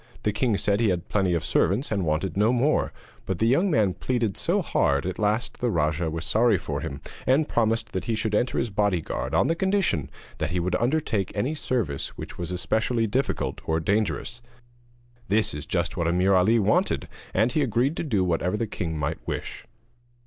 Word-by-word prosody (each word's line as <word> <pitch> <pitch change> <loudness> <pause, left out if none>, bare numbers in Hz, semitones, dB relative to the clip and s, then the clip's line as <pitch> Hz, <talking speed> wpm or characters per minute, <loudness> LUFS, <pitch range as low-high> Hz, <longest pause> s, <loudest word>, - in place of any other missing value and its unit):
The 105 - +1
king 110 0 +1
said 100 +1 +1
he 115 -2 +3
had 90 -2 -2
plenty 95 -4 +1
of 80 -3 -2
servants 100 - +1
and 100 -3 0
wanted 80 +3 -1
no 105 +4 +3
more; 125 +5 +2 0.4
but 95 - -1
the 110 - +1
young 155 - +3
man 105 - +2
pleaded 120 -4 -1
so - - +1
hard 70 -1 +1
that 95 - -1
at - - -11
last 110 +3 0
the 125 - +1
rajah 80 -2 0
was 80 +1 -4
sorry 115 -2 +3
for - - -4
him, 70 0 -5 0.3
and 140 +4 +3
promised 115 -1 0
that 95 - -3
he 115 - 0
should 110 0 -2
enter 120 +4 +1
his 115 - 0
bodyguard 100 -5 -1
on - - +4
the 165 - +2
condition 185 - 0 0.3
that 80 - -1
he 90 +2 -1
would 90 +1 -1
undertake 120 -6 0
any 125 +9 0
service 115 - -2
which - - -7
was 85 -1 -3
especially 110 +6 0
difficult 130 +6 -1
or 80 0 +2
dangerous. 105 +5 -1 0.9
This 105 +3 +2
was 75 +1 -6
just 85 +2 -1
what 85 -3 -1
Ameer 90 +3 +3
Ali 95 +5 +4
wanted, 110 -1 +1 0.2
and 110 +5 +2
he 150 - +1
agreed 130 +3 +1
to - - -1
do 110 - +1
whatever 90 +2 0
the 115 - -1
king 85 -6 -4
might 75 +2 -2
wish. - - -5
105 Hz, 200 wpm, -25 LUFS, 90-120 Hz, 0.9 s, on